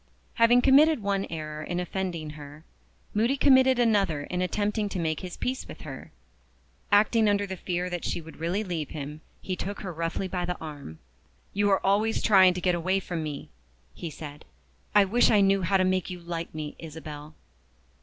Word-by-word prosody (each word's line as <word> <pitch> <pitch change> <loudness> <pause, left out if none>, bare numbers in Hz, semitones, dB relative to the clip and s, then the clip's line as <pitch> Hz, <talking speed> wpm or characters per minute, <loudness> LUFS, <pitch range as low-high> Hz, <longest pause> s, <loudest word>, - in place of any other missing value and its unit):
Having 240 +2 +5
committed 285 -2 +5
one 200 -1 0
error 155 -2 -5
in 175 +3 -3
offending 175 -3 -3
her, 150 +1 -11 0.5
Moody 235 +6 +2
committed 260 -2 +5
another 200 -11 +2
in 180 +4 -3
attempting 205 +3 -1
to 195 - -4
make 160 -3 -1
his 180 -2 -7
peace 260 +1 -3
with - - -10
her. 135 -4 -9 0.8
Acting 215 +1 +4
under 205 0 +1
the 190 -1 -5
fear 180 0 -2
that 175 -1 -4
she - - -2
would 160 0 -12
really 175 +6 -1
leave 165 -7 -4
him, 150 0 -7 0.2
he 185 - -2
took 200 +3 -5
her 185 -3 -5
roughly 165 +3 -2
by 180 -1 -3
the 180 0 -3
arm. 145 - -8 0.6
"You 205 0 +2
are 195 - +2
always 210 +3 +2
trying 190 -4 +6
to 180 - -4
get 180 0 +2
away 185 +3 +1
from 175 -3 -4
me," 150 -2 -6 0.4
he 170 - -6
said. 150 0 -9 0.5
"I 205 -1 +7
wish 235 +6 +3
I 210 - +5
knew 195 0 +4
how 190 +2 +2
to 185 - +2
make 185 0 0
you 180 -1 -6
like 170 -1 -5
me, 150 -1 -5
Isabel." 155 -1 -9
180 Hz, 190 wpm, -27 LUFS, 160-205 Hz, 0.8 s, I